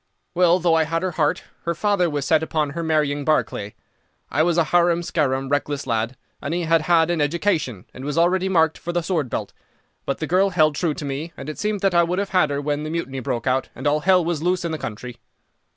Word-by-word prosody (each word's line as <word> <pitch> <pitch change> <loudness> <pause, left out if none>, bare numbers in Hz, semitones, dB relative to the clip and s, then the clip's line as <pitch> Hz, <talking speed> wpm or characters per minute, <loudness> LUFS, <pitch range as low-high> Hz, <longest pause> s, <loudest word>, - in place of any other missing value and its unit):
"Well, 180 0 +4
though 175 -2 +2
I 160 -1 +3
had 165 +2 -2
her 185 - -1
heart, 155 -3 0 0.2
her 170 0 -1
father 200 -2 +1
was 145 -2 -2
set 160 -1 +3
upon 155 -2 -1
her 170 +4 -4
marrying 150 -3 0
Barclay. 120 -9 -1 0.6
I 145 - +2
was 170 +1 +2
a 170 - +5
harum 175 +1 +2
scarum, 135 -5 0
reckless 145 0 -1
lad, 115 +1 -1 0.2
and 150 +4 -3
he 175 - -1
had 165 0 +3
had 165 +1 +3
an 170 -3 0
education, 145 - -1
and 130 - -9
was 145 +2 -3
already 185 +3 +2
marked 160 -4 +2
for 175 - -4
the 175 -1 -1
sword 160 -7 -1
belt. - - -4 0.5
But 140 - -1
the 160 - -3
girl 185 +5 +3
held 155 -5 +3
true 155 0 -1
to 150 - -6
me, 145 +5 -4
and 135 - -7
it 155 - -7
seemed 210 -2 -1
that 195 -2 +2
I 170 - +5
would 175 +2 0
have 200 0 -1
had 180 -5 +3
her 140 0 -1
when 145 0 -2
the 155 - -4
Mutiny 155 -5 -3
broke 120 -2 -3
out, 130 0 0
and - - -8
all 145 +1 +3
hell 180 +1 +3
was 165 -3 -1
loose 180 +1 0
in 170 - -2
the 160 - -3
country. 120 +3 -7
160 Hz, 245 wpm, -22 LUFS, 145-175 Hz, 0.6 s, a